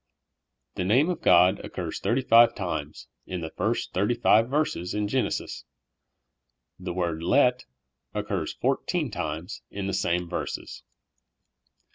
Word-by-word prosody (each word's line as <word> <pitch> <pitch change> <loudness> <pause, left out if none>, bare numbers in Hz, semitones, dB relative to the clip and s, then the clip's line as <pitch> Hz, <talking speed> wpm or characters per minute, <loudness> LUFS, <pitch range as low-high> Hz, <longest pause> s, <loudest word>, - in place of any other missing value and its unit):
THE - - -3
name 125 - +3
of 175 - -5
God 90 +3 +5
occurs - - -5
thirt3' 130 +2 0
five 115 0 +7
times 75 -6 -5 0.2
in 90 -2 -4
the 80 - -5
first - - -2
thirt3^ 105 +6 0
five 115 +3 +5
verses 145 - -1
in 105 0 0
Genesis; 130 +4 -2 1.2
and 90 - -10
the 90 - -2
word 85 -3 -2
"let 125 +7 +3 0.2
" - - -53
occurs - - -2
fourteen 135 +2 -1
times 80 +1 -5
in 100 -1 -5
the 95 - -2
same 85 +1 0
verses. 85 - -5
100 Hz, 140 wpm, -26 LUFS, 90-125 Hz, 1.2 s, five